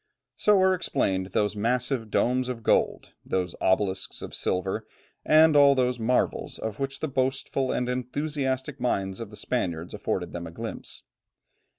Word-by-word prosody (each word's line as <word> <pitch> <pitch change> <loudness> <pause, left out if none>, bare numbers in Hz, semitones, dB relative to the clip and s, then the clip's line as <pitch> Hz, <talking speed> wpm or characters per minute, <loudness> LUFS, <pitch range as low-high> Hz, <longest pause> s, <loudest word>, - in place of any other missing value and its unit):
So 210 -2 +4
are 190 0 +5
explained 95 - 0
those 105 +2 0
massive 120 +2 -1
domes 125 +3 +1
of 115 -3 -5
gold, - - +1
those 90 -2 -1
obelisks 95 0 0
of - - -7
silver, 95 +4 -1 0.4
and 155 0 +6
all 140 -1 +7
those 125 -1 +1
marvels 125 +3 0
of 110 +1 -5
which 135 0 -3
the 155 - 0
boastful 130 0 -1
and 125 - -1
enthusiastic 130 +2 -2
minds 95 -6 -1
of 115 -3 -6
the 105 - -11
Spaniards 85 -8 -2
afforded - - -2
them 85 -1 -5
a - - -9
glimpse. - - -7
125 Hz, 155 wpm, -27 LUFS, 100-135 Hz, 0.4 s, all